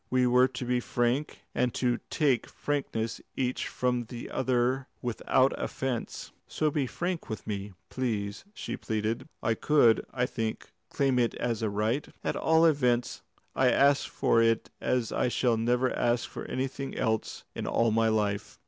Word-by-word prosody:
We 130 0 +3
were 125 +1 +5
to 125 -1 -6
be 125 0 +1
frank, 120 +4 -1
and 125 -1 0
to 120 -2 +1
take 140 -7 +2
frankness 125 -6 -2 0.2
each 125 -1 -1
from 125 -1 -1
the 120 +1 -8
other 130 +1 +1
without 125 +2 +2
offence. 130 -3 -3 0.2
So 155 -1 0
be 140 -3 0
frank 175 +6 -3
with 110 - -5
me! 100 -1 -4 0.2
Please!" 105 -5 -2
and 205 +2 -29
she - - -4
pleaded. 110 +6 -2
"I 115 - +2
could, 120 -2 +4
I 125 -1 0
think, 115 -3 -4 0.2
claim 135 -2 +1
it 120 -1 +1
as 115 -3 -2
a 110 - +1
right. 110 +7 0 0.2
At - - -1
all 160 +1 +4
events 125 -6 +2 0.3
I 130 -1 +4
ask 140 +3 +4
for 115 - +2
it 115 0 +2
as 125 -3 0
I - - +1
shall 120 -1 +2
never 125 +3 +1
ask 120 0 +1
for - - -7
anything 135 +1 -3
else 110 -1 -1
in - - -4
all 115 -1 +2
my 115 +1 +3
life." 105 -2 -1
125 Hz, 165 wpm, -29 LUFS, 115-130 Hz, 0.3 s, were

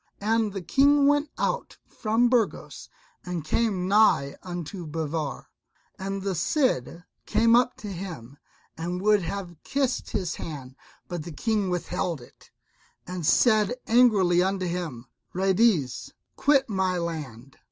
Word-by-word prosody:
And 220 +1 +1
the 195 -2 -5
King 280 +9 +4
went 290 +1 +3
out - - -2
from 225 +2 +1
Burgos 240 -4 -1 0.3
and 175 -4 -4
came 195 -1 0
nigh 195 -9 +4
unto 175 0 -6
Bivar; 155 -2 -3 0.5
and 195 0 -4
the 195 -1 -1
Cid 175 - 0 0.2
came 230 0 +4
up 245 +1 +2
to 210 - -8
him 165 -9 -7 0.4
and 175 +2 -4
would 210 +1 +3
have 180 -1 -5
kissed 270 -2 -1
his 180 -5 -2
hand, 135 -5 -7 0.3
but 175 -2 -4
the 170 - -8
King 210 +4 -1
withheld 175 -2 -2
it, 120 - -17 0.6
and 180 -1 -5
said 215 -1 +4
angrily 210 -7 +4
unto 190 0 0
him, 170 -9 -4 0.3
"Ruydiez, 190 - +1 0.2
quit 275 -2 +3
my 190 -4 0
land." 145 -7 -6
185 Hz, 130 wpm, -26 LUFS, 165-220 Hz, 0.6 s, King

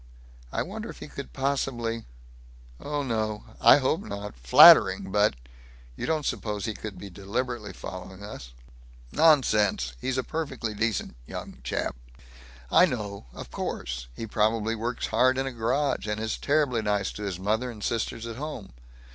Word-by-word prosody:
I - - -1
wonder - - -6
if - - -9
he - - -8
could 65 - -8
possibly 120 - -1 0.7
Oh 145 0 -2
no. 110 -4 -2 0.2
I - - +9
hope 145 +6 +1
not. 100 - -6
Flattering, 60 +8 +7
but 105 -6 +3 0.6
You - - -4
don't 155 -2 0
suppose 105 -2 -2
he 110 - -2
could 105 -1 -7
be 100 - -9
deliberately 105 +4 -3
following 95 +1 -8
us?" 65 -11 -8 0.6
"Nonsense! 105 - +3
He's 130 0 -1
a 130 - +1
perfectly 135 -8 -3
decent 110 - -1
young - - -7
chap." - - -2 0.8
"I 180 - +7
know. 105 - -5
Of - - -10
course. - - -4
He - - -5
probably 110 +1 +1
works 115 +2 -3
hard 130 +4 +3
in 135 - 0
a 135 - -3
garage, 125 +2 0
and 105 0 -2
is 110 0 -2
terribly 140 -5 +1
nice 105 -2 0
to - - -9
his 100 -4 -3
mother 110 +6 0
and 110 -4 -9
sisters 115 0 -2
at 115 0 -6
home. 140 - -6
110 Hz, 160 wpm, -27 LUFS, 105-130 Hz, 0.8 s, I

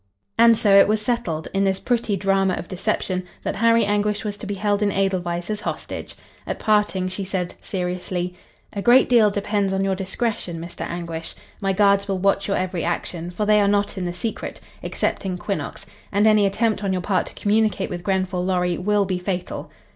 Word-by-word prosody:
And 230 -1 +6
so 205 -2 +3
it 195 - +8
was 215 +1 +2
settled, 210 -9 -2
in 195 0 +2
this 190 -1 +1
pretty 230 -4 0
drama 195 -1 +2
of - - -6
deception, 185 -1 -1 0.2
that - - -2
Harry 230 0 +4
Anguish 205 +1 0
was 205 -1 -2
to 205 - -7
be 205 - -2
held 205 +1 0
in 205 -1 +2
Edelweiss 180 -2 -1
as 210 -1 -3
hostage. - - -5 0.3
At - - -2
parting 210 -3 +1
she 185 +2 -4
said, 185 -2 -3
seriously: 180 -1 -3 0.4
"A 200 - -3
great 245 +4 +6
deal 230 -4 +5
depends 205 -1 0
on 195 0 +1
your 195 0 +1
discretion. 190 -2 -3
Mr. 170 +1 -6
Anguish. 170 -1 -5 0.2
My 195 -1 0
guards 200 0 +3
will 195 -1 0
watch 195 +1 +1
your 200 - +1
every 185 -2 -2
action, 175 0 -3
for 180 +4 -2
they 210 0 +5
are 200 - +3
not 205 0 +1
in 185 -2 -3
the 175 - -2
secret, 220 +5 -4 0.2
excepting 185 -2 -2
Quinnox, 200 +2 -4 0.3
and 205 +2 +3
any 215 -2 +5
attempt 215 +1 0
on 195 - 0
your 180 -1 -2
part 190 -1 +1
to - - -12
communicate 215 +1 +1
with 175 - -4
Grenfall 185 -2 0
Lorry 180 -1 0
will 205 +2 +2
be 185 -1 -2
fatal." 180 -1 -4
195 Hz, 200 wpm, -22 LUFS, 180-210 Hz, 0.4 s, it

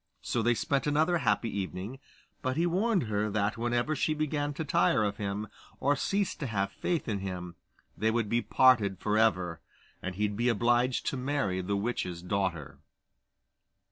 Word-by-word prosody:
So 120 - 0
they 120 +1 +3
spent 140 +4 0
another 155 +4 +2
happy 110 -4 0
evening, 100 +5 -4 0.4
but 130 +1 -1
he 170 - +3
warned 190 +2 +2
her 105 -1 -1
that 100 0 0
whenever 120 +5 0
she 155 +2 0
began 150 -1 -1
to 160 - -3
tire 110 -5 +3
of 100 -1 -1
him, 100 +1 -3 0.3
or 145 +2 +2
ceased 195 +5 -1
to 140 - -2
have 100 -3 -1
faith 170 - -2
in 105 -3 -1
him, 90 -2 -5 0.4
they 110 - +1
would 115 -1 0
be 115 +3 +1
parted 115 -9 +4
for 105 0 0
ever, 90 -7 +1 0.4
and 90 -1 -4
he'd 105 +1 -1
be 120 +3 +1
obliged 120 +2 +2
to 135 - -1
marry 125 -9 -1
the 100 +2 -1
witch's 90 -5 -3
daughter. 90 -5 -2
115 Hz, 170 wpm, -30 LUFS, 100-140 Hz, 0.4 s, parted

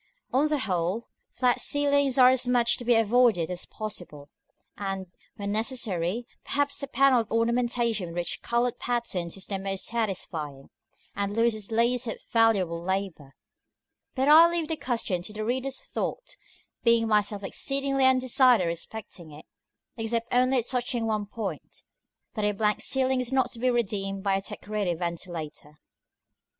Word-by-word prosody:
On 275 +4 +3
the 300 0 0
whole, 190 -1 -2 0.2
flat 250 -1 +1
ceilings 285 -2 +2
are 255 -1 +8
as 260 -1 +2
much 245 -1 +3
to - - -8
be 240 0 +3
avoided 225 -6 +3
as 180 0 -5
possible; 175 -9 -7 0.4
and, 195 -1 -4 0.3
when 200 0 -4
necessary, 220 -3 -1 0.2
perhaps 285 0 -1
a 280 - -4
panelled 265 -4 +3
ornamentation 235 -3 0
with 170 - -9
rich 175 -1 -2
colored 240 0 0
patterns 200 -8 -2
is 195 - -6
the 195 -2 -4
most 195 0 -2
satisfying, 170 -11 -3 0.4
and 200 0 -2
loses 225 -2 0
least 240 +2 +1
of 225 - -4
valuable 200 -8 +3
labor. 180 -7 -4 0.8
But 265 +1 +1
I 320 +3 +8
leave 340 -2 -2
the 320 - 0
question 230 - -2
to 210 +4 -8
the 215 0 -4
reader's 260 +3 -2
thought, - - -5 0.5
being 230 -1 +4
myself 205 -1 +1
exceedingly 275 +6 0
undecided 255 -4 +4
respecting 170 0 -5
it: 150 +1 -13 0.5
except 230 +1 -2
only 255 0 +3
touching 245 -1 -1
one 215 -2 -1
point 210 -1 -6 0.5
that 215 - -3
a 210 0 +2
blank 210 +1 0
ceiling 265 -1 +1
is 250 0 -2
not 260 -2 +1
to 235 - -9
be 255 +2 +2
redeemed 195 -5 -1
by 195 -1 +2
a 195 - -1
decorated 205 -3 -3
ventilator. 170 -3 -5
§ - - -20
IV. - - -29
225 Hz, 155 wpm, -27 LUFS, 195-250 Hz, 0.8 s, are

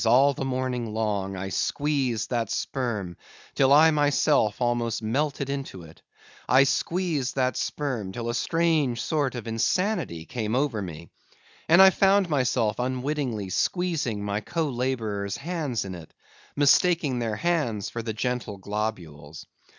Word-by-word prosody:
all 135 +5 +5
the 135 - -4
morning 130 -3 -2
long; 100 -3 -1
I 95 +1 -4
squeezed 130 -2 -1
that 115 -4 -1
sperm 105 -9 -3 0.4
till 135 0 +3
I 155 +3 +7
myself 145 -6 +2
almost 120 -2 -1
melted 140 +4 -1
into 140 -10 -5
it; 80 0 -15 0.5
I 130 +2 +6
squeezed 155 -2 -1
that 130 -3 +1
sperm 125 -10 -3
till 115 +4 -5
a 120 - -1
strange 150 -1 +1
sort 145 -1 -1
of 120 - -6
insanity 115 - -1
came 110 +1 -3
over 130 -5 0
me; 85 -3 -8 0.6
and 170 +4 +8
I 190 - +8
found 195 -2 +3
myself 125 -6 +1
unwittingly 125 -4 -2
squeezing 145 - -1
my 100 0 -1
co 160 +5 -2
laborers' 115 -6 -2
hands 145 - -3
in 95 - -6
it, 85 -3 -11 0.4
mistaking 145 -1 +3
their 115 -3 -2
hands 120 - -1
for 115 - -4
the 115 0 -4
gentle 120 -2 -3
globules. 90 -8 -5
125 Hz, 145 wpm, -26 LUFS, 105-145 Hz, 0.6 s, and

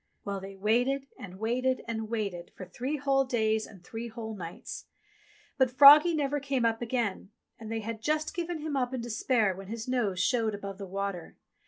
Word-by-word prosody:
Well, 200 -1 -3
they 195 0 -8
waited, 245 +7 +1
and 185 -1 -9
waited, 250 +4 0
and 220 -1 -3
waited 200 -7 -3
for 185 - -8
three 255 +11 -3
whole 275 -1 +2
days 220 -4 0
and 195 -5 -15
three 225 +6 -6
whole 225 -1 -6
nights; 170 -4 -7 0.7
but 260 -1 +5
froggie 295 +6 +9
never 290 -1 0
came 275 -3 0
up 225 0 +1
again, 230 -5 -2 0.3
and 220 -1 -8
they 225 0 -2
had 220 0 -5
just 305 +4 0
given 340 -2 -3
him 305 -1 -3
up 260 -1 0
in 250 - -3
despair 230 -3 +1
when 195 0 -9
his 225 +2 -5
nose 225 -8 0
showed 220 +1 +1
above 200 -1 -7
the 195 - -6
water. 195 -2 -4
230 Hz, 190 wpm, -29 LUFS, 200-260 Hz, 0.7 s, froggie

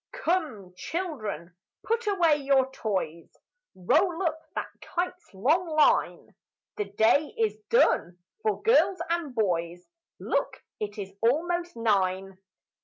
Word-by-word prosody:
"Come, 310 - -2
children, 215 - -4 0.3
put 460 0 -1
away 345 -7 +3
your 270 -2 +2
toys; 185 -9 -4 0.4
Roll 340 - +2
up 320 -2 -1
that - - -3
kite's 360 0 -4
long 300 - +1
line; 310 -1 +2 0.4
The 210 - -1
day 220 - +2
is 440 -1 0
done 180 - +3 0.2
for 430 -2 -1
girls 430 -4 +4
and 330 -7 -2
boys 175 -4 -1 0.3
Look, - - -2 0.2
it 205 0 -4
is 195 -2 -6
almost 345 +8 0
nine! 195 -4 0
275 Hz, 115 wpm, -27 LUFS, -, 0.4 s, girls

